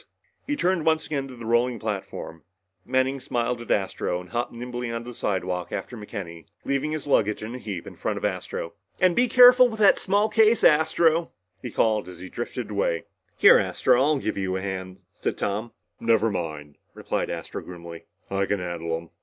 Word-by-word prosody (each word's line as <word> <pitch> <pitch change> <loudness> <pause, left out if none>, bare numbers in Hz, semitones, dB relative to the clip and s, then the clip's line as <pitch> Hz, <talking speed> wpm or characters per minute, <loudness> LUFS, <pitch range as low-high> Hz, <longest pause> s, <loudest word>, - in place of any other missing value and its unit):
He 290 - 0
turned 185 - +1
once 160 0 +2
again 140 -3 -3
to 130 - -10
the 120 -1 -9
rolling 120 +1 +2
platform. 100 -6 -5 0.5
Manning 130 +2 +1
smiled 120 -1 -2
at 120 - -10
Astro 95 -2 0
and 90 0 -12
hopped 120 +1 -2
nimbly 120 0 -5
onto 115 +1 -5
the - - -10
slidewalk 90 -4 -2
after 125 - -5
McKenny, 95 -6 -8 0.2
leaving 140 +2 0
his 155 -1 -4
luggage 105 -7 +1
in 110 +2 -6
a 125 - -6
heap 100 -7 -6
in - - -10
front - - -2
of - - -3
Astro. 85 - -3 0.3
"And 185 -2 +4
be 250 - +4
careful 250 +1 +8
with 220 -1 -7
that 205 -2 +6
small 205 +2 +2
case, 220 +1 +4
Astro," 160 +2 +3 0.3
he - - -5
called 110 -4 +1
as 90 - -10
he 95 +2 -9
drifted 120 0 -5
away. 100 -5 0 0.3
"Here, - - +8
Astro," - - +2
said - - +2
Tom. 135 - +3
"I'll 155 -1 +3
give 110 -6 -3
you 95 -1 -1
a - - -4
hand." 95 -1 -5 1.0
"Never 115 -1 +2
mind," 75 -6 -5 0.2
replied - - -2
Astro - - -5
grimly. 85 -2 -10 0.3
"I 100 0 0
can 100 - 0
carry 85 -2 -4
'em." 80 0 -4
115 Hz, 195 wpm, -25 LUFS, 95-145 Hz, 1.0 s, careful